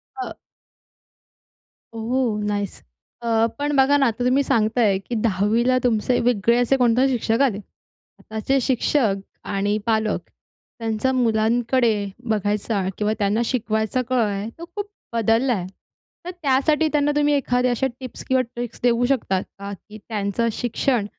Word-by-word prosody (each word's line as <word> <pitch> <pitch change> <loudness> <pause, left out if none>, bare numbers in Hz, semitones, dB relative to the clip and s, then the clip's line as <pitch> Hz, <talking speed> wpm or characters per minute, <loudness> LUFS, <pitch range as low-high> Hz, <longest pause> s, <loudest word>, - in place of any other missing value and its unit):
अ 390 - -5 1.6
ओह! 230 -1 -1
Nice. 205 -1 -3 0.4
अ, 225 -1 +2
पण 290 0 0
बघा 275 +1 +5
ना 275 - +3
आता 235 +1 -1
तुम्ही 265 +3 +3
सांगत 220 -2 +1
आहे, 205 -5 +4
की 235 +5 -6
10वी 215 +3 +1
ला 255 0 +4
तुमचे 245 +1 +2
वेगळे 235 0 +2
असे 245 +2 +3
कोणते 250 +1 +3
शिक्षक 230 -1 0
आले. 245 -8 +2 0.6
आताचे 220 +5 -1
शिक्षक 250 -3 +1 0.4
आणि 205 +1 +1
पालक 220 -2 +1 0.6
त्यांचा 225 +3 0
मुलांकडे 230 -2 +2 0.2
बघायचा 210 0 0 0.2
किंवा 210 0 +1
त्यांना 205 +3 +1
शिकवायचा 220 -1 0
काळ 255 -2 +2
आहे 205 +1 -2
तो 335 - -8
खूप 410 -1 -2 0.3
बदलला 230 +3 +2
आहे. 185 -5 -3 0.6
तर, 360 - -4
त्यासाठी 305 -1 +2
त्यांना 295 0 +2
तुम्ही 295 0 +3
एखाद्या 250 -2 +1
अशा 265 +3 +1
टिप्स 255 -2 -8
किंवा 260 0 +3
ट्रिक्स 240 -1 -5
देऊ 240 0 +3
शकता 220 -8 +1
का? 200 +1 -9
की, 210 +2 -12
त्यांचं 215 +1 -1
शिक्षण 240 -1 0
235 Hz, 145 wpm, -22 LUFS, 215-260 Hz, 1.6 s, बघा